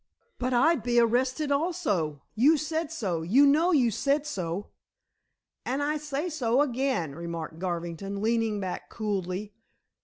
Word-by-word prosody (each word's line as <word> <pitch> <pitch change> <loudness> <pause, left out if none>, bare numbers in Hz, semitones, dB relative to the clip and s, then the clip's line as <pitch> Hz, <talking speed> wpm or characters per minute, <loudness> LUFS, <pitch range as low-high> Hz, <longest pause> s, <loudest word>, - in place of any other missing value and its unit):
"But 255 +1 -1
I'd 275 +4 +3
be 240 +1 +2
arrested 255 +5 +1
also. 280 - 0
You 280 +9 +5
said 315 +1 -2
so; 190 - -2
you 230 +13 +5
know 310 +6 +4
you 255 -8 +4
said 280 +7 +1
so." 185 - -4 0.9
"And 270 +3 -1
I 300 +1 0
say 295 +2 -3
so 265 -6 +1
again," 255 - -1
remarked 165 0 -6
Garvington, 175 +2 -4
leaning 225 -1 +1
back 185 -2 -5
coolly. 200 -1 -3
240 Hz, 140 wpm, -28 LUFS, 185-285 Hz, 0.9 s, You